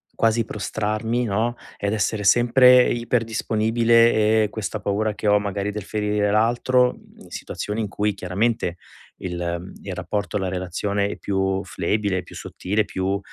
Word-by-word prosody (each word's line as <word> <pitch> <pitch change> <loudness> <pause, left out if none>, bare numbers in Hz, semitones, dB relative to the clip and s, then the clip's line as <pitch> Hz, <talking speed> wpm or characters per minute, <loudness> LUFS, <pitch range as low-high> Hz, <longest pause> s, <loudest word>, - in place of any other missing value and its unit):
quasi 115 0 +2
prostrarmi, 110 +3 -2
no, 115 +3 0 0.2
ed 100 - -2
essere 110 0 -1
sempre 125 +4 +6
iper 120 0 0
disponibile 110 0 +3
e - - -2
questa 105 0 -4
paura 105 +2 -1
che 105 - -4
ho 105 0 +5
magari 100 0 -3
del 105 -1 -5
ferire 105 0 0
l'altro, 120 +3 +3
mhmm, - - -20
in - - -16
situazioni 105 +2 -4
in 105 - -3
cui 105 +1 -1
chiaramente 95 0 -1 0.4
il 85 -1 -4
il - - -6
rapporto, 105 0 -3
la 95 -2 -2
relazione 95 +2 -2
è - - -6
più 95 -1 -1
flebile, 100 +2 -1
è - - -7
più - - -13
sottile, 105 +3 -2
più 95 +1 -2
105 Hz, 160 wpm, -23 LUFS, 100-115 Hz, 0.4 s, sempre